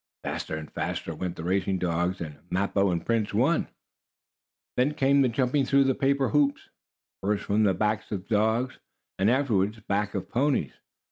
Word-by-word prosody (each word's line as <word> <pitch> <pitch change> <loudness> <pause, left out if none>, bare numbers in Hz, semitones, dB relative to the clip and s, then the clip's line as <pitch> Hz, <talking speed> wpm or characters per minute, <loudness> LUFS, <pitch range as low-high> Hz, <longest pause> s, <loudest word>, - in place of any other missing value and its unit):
Faster - - -3
and 75 -1 -7
faster - - -3
went 90 -2 -4
the 80 - -7
racing 95 +2 0
dogs, 90 +1 -1
and 75 -3 -6
Mappo 100 +1 +1
and 85 -1 -2
Prince 110 -3 0
won. 135 +10 +2 1.1
Then 135 +4 +1
came 140 +1 +4
the 130 - +3
jumping 130 +3 +1
through 140 +1 +4
the 135 -1 +2
paper 135 0 +1
hoops, 145 -1 +1 0.5
first 100 +1 0
from 105 +2 +2
the 95 -2 +3
backs 105 0 -1
of 100 -2 -4
dogs, 115 +4 +1 0.4
and, 95 +3 +4
afterward 110 -5 +1
backs 105 +1 0
of 95 - -2
the - - -32
ponies. 130 - +1
105 Hz, 175 wpm, -27 LUFS, 95-135 Hz, 1.1 s, came